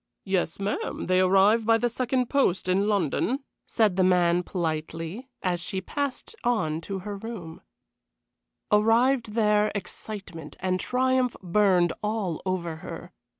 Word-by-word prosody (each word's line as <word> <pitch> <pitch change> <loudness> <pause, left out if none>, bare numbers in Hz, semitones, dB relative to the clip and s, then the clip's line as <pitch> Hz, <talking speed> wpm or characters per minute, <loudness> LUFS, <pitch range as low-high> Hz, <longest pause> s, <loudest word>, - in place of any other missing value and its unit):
"Yes, 190 -4 -1
ma'am, 200 +1 -3
they 185 0 +3
arrive 195 +4 +4
by 225 +1 +4
the 240 - +1
second 250 +1 -1
post 245 -11 +1
in 190 +3 +2
London," 210 - 0 0.2
said 210 -5 +2
the 190 - +4
man, 180 -1 +3
politely, 165 - -4
and 180 -2 0
she 190 +3 -3
passed 280 - -4
on 165 -10 0
to 195 +3 -5
her 205 -1 -4
room. 195 -6 -8 1.1
Arrived 225 +2 +3
there, 210 -1 +3
excitement 190 -5 -6
and 185 0 0
triumph 255 +2 +1
burned 180 -2 +3
all 210 -6 -2
over 170 -3 -2
her. - - -8
200 Hz, 135 wpm, -26 LUFS, 180-225 Hz, 1.1 s, arrive